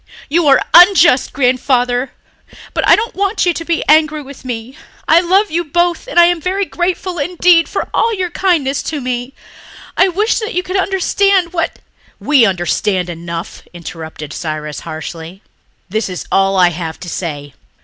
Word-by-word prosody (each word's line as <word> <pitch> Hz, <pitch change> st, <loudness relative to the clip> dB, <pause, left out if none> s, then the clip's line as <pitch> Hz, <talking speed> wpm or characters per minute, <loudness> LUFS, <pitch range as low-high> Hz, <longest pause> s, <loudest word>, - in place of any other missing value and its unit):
You 325 Hz, +1 st, +1 dB
are 270 Hz, -2 st, +5 dB
unjust, 350 Hz, -6 st, +6 dB
Grandfather. 250 Hz, -1 st, 0 dB, 0.6 s
But -, -, -1 dB
I -, -, +7 dB
don't 455 Hz, +2 st, -3 dB
want 400 Hz, +1 st, -1 dB
you 350 Hz, -, +2 dB
to 330 Hz, -, -5 dB
be 335 Hz, 0 st, -1 dB
angry 310 Hz, -1 st, +3 dB
with 275 Hz, 0 st, -13 dB
me. 245 Hz, 0 st, -6 dB, 0.3 s
I 325 Hz, -, +6 dB
love 380 Hz, +3 st, +2 dB
you 340 Hz, +2 st, 0 dB
both 345 Hz, +6 st, -1 dB
and -, -, +1 dB
I 345 Hz, -, +8 dB
am 345 Hz, -1 st, +1 dB
very 385 Hz, +4 st, -1 dB
grateful 355 Hz, 0 st, -3 dB
indeed 345 Hz, +1 st, +3 dB
for -, -, -3 dB
all 460 Hz, -, +2 dB
your 370 Hz, -5 st, -3 dB
kindness 315 Hz, -8 st, 0 dB
to 305 Hz, -, -4 dB
me. 250 Hz, +1 st, -4 dB, 0.6 s
I 375 Hz, -, +4 dB
wish 415 Hz, +6 st, 0 dB
that 445 Hz, +1 st, -5 dB
you 360 Hz, -, 0 dB
could 370 Hz, +1 st, -5 dB
understand 385 Hz, -1 st, +1 dB
what...." 330 Hz, -2 st, -2 dB, 0.4 s
"We 280 Hz, -6 st, +4 dB
understand 180 Hz, 0 st, -1 dB
enough," 170 Hz, 0 st, -7 dB
interrupted 160 Hz, -3 st, -8 dB
Cyrus 155 Hz, -2 st, -5 dB
harshly. 165 Hz, +3 st, -8 dB, 0.4 s
"This 215 Hz, +2 st, -2 dB
is 180 Hz, -, -6 dB
all 195 Hz, 0 st, +2 dB
I 180 Hz, -1 st, +5 dB
have 165 Hz, -1 st, -6 dB
to 180 Hz, -, -8 dB
say. 145 Hz, -5 st, -5 dB
285 Hz, 170 wpm, -15 LUFS, -, 0.6 s, I